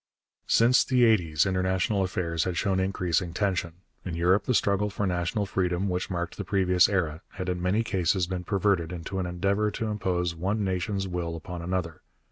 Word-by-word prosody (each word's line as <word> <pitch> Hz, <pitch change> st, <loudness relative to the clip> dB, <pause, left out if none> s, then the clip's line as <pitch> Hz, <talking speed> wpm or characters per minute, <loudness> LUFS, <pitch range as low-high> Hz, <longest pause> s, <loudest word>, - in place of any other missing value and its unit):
Since 120 Hz, +3 st, +5 dB
the 125 Hz, -2 st, +3 dB
eighties 85 Hz, -10 st, +3 dB
international 95 Hz, +1 st, +1 dB
affairs 85 Hz, -3 st, -1 dB
had 90 Hz, -2 st, -2 dB
shown 95 Hz, 0 st, +1 dB
increasing 90 Hz, -3 st, -1 dB
tension. 90 Hz, -3 st, -1 dB, 0.2 s
In 90 Hz, -3 st, -4 dB
Europe 90 Hz, +4 st, +2 dB
the 125 Hz, -, +1 dB
struggle 100 Hz, 0 st, +2 dB
for 100 Hz, 0 st, -2 dB
national 90 Hz, +3 st, -1 dB
freedom, 90 Hz, 0 st, -1 dB
which 90 Hz, 0 st, -2 dB
marked 85 Hz, -2 st, -3 dB
the 100 Hz, -, -3 dB
previous 95 Hz, -2 st, +3 dB
era, 85 Hz, -5 st, -1 dB
had 95 Hz, -1 st, -4 dB
in 90 Hz, -1 st, -2 dB
many 95 Hz, +5 st, +1 dB
cases 95 Hz, -4 st, +1 dB
been 90 Hz, 0 st, -4 dB
perverted 95 Hz, -3 st, +1 dB
into 90 Hz, +2 st, -5 dB
an 90 Hz, -, -2 dB
endeavour 100 Hz, +4 st, 0 dB
to 110 Hz, +2 st, -4 dB
impose 90 Hz, -5 st, -1 dB
one 100 Hz, +6 st, -1 dB
nation's 95 Hz, +1 st, -1 dB
will 85 Hz, -2 st, -3 dB
upon 85 Hz, +1 st, -7 dB
another. 85 Hz, -2 st, -3 dB
95 Hz, 180 wpm, -27 LUFS, 90-100 Hz, 0.2 s, Since